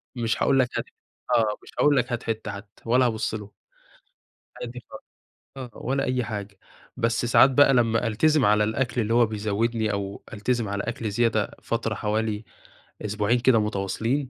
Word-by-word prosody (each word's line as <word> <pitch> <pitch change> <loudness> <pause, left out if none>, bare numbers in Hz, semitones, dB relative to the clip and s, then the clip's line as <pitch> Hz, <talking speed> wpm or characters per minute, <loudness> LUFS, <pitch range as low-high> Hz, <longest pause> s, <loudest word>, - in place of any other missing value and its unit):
مش 115 -2 -1
هاقول 135 -1 +3
لك 125 -1 +3
هات - - -2
ح - - -39 0.4
آه، 110 -3 +2
مش - - -15
هاقول 145 -1 +4
لك 125 0 0
هات 120 - -2
حتّة 110 -2 -3
حتّى 100 0 -12
ولا 125 +2 +3
هابص 110 -2 -1
له. 105 -1 -6 1.1
عادي 125 0 -7
خالص، - - -11 0.5
آه 130 -2 -7
ولا 135 +2 -2
أي 125 -1 0
حاجة، 100 -2 -6 0.4
بس 115 +1 0
ساعات 125 +3 +6
بقى 135 0 +5
لمّا 115 -2 +2
ألتزم 145 +6 +3
على 105 +1 +4
الأكل 120 +2 -1
اللي 110 0 0
هو 120 0 +5
بيزوّدني، 110 +1 -1
أو 100 0 -4
ألتزم 115 +1 -1
على 100 0 -2
أكل 115 -2 -3
زيادة 110 -1 +1
فترة 115 -1 -2
حوالي 105 +1 -2 0.6
أسبوعين 105 +3 0
كده 120 -1 +4
متواصلين، 110 +6 -1
115 Hz, 170 wpm, -25 LUFS, 105-125 Hz, 1.1 s, ساعات